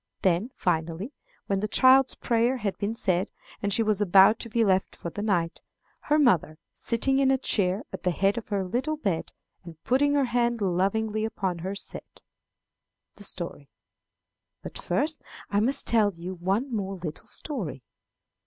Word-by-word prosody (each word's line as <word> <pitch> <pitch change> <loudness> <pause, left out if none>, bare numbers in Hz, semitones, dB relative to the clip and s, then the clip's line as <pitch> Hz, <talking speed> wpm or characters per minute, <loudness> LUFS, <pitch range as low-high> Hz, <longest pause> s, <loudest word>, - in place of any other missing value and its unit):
Then, 185 +5 +2
finally, 170 - -2 0.3
when 195 -1 0
the 215 - -1
child's 260 +4 +5
prayer 235 +2 +1
had 205 -5 -2
been 210 +3 -2
said, 185 -2 0 0.3
and 205 - -1
she 225 - +2
was 215 -2 +1
about 195 +3 +6
to 230 - -5
be 230 +1 +2
left 190 -2 +1
for 170 - -6
the 205 - -5
night, 180 -5 0 0.4
her 300 - +1
mother, 180 - +3
sitting 270 +4 +1
in 270 -1 +3
a 265 - +4
chair 200 -4 0
at - - -6
the 180 - +1
head 195 +4 +1
of 235 - -5
her 200 -2 -1
little 255 +11 -2
bed, 190 - -2 0.3
and 165 -2 -11
putting 285 +4 +2
her 280 -2 +3
hand 240 -1 0
lovingly 205 +3 0
upon 190 -5 -2
her, 190 +4 -4
said: - - -7 0.9
The - - -11
Story. - - -7 0.9
"But - - -7
first 310 +2 0 0.3
I 200 - +2
must 265 +6 +1
tell 215 -3 +4
you 175 +1 -7
one 195 +9 -1
more 195 -2 -3
little 170 -4 -7
story. 185 - -5
205 Hz, 170 wpm, -27 LUFS, 185-240 Hz, 0.9 s, about